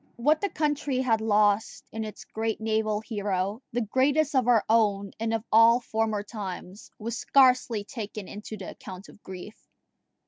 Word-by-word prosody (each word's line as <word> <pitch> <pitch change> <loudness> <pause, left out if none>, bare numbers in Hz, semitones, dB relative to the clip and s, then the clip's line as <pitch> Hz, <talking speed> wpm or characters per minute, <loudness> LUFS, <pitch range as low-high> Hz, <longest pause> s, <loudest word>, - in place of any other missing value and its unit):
What 300 +6 +2
the 405 - 0
country 290 -4 -1
had 235 -4 +1
lost 210 -1 +1
in 220 0 -4
its 215 -1 -8
great 220 0 -3
naval 220 -1 0
hero 205 -1 -2
the 240 - -1
greatest 275 +7 +1
of 260 -3 +2
our 235 -4 +4
own 205 -3 +2
and 225 0 -1
of 225 -1 -1
all 230 +2 +7
former 220 -3 -1
times 200 -2 -7
was 230 +1 -4
scarcely 250 -5 +3
taken 215 -3 -7
into 210 +1 -8
the 190 - -7
account 185 +1 -10
of 205 - -17
grief. 190 +3 -11
220 Hz, 165 wpm, -27 LUFS, 205-240 Hz, -, all